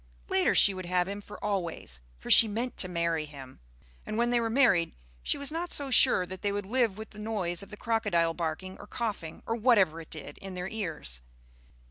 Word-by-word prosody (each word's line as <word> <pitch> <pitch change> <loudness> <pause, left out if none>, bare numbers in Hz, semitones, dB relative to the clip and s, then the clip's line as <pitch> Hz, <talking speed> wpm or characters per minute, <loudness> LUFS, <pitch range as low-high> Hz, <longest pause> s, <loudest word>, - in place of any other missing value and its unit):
Later 190 - +3
she 200 - +6
would 185 -1 -6
have 180 0 +1
him 200 +1 -5
for 205 - -10
always, 170 - -3 0.2
for - - -5
she 225 - +10
meant 235 +4 -3
to 185 - -1
marry 170 -3 -1
him. 135 -3 -11 0.4
And 215 - -4
when 240 +1 +2
they 240 - +3
were 230 -1 0
married 225 -9 +3 0.3
she - - -1
was 280 +1 -2
not 340 +2 -3
so 280 -2 -1
sure 245 -7 +5
that 185 +1 -7
they 205 - 0
would 205 -1 -3
live 225 -2 +1
with 220 0 -8
the 210 - -12
noise 205 -6 -2
of 200 - -8
the 210 - -9
crocodile 205 -8 +1
barking 170 +3 -4
or - - -11
coughing, 210 -10 -4
or 230 - -1
whatever 205 -9 +3
it 160 - -13
did, 155 - -8
in 195 -1 -8
their 180 0 -3
ears. 160 - -4
195 Hz, 215 wpm, -29 LUFS, 170-225 Hz, 0.4 s, she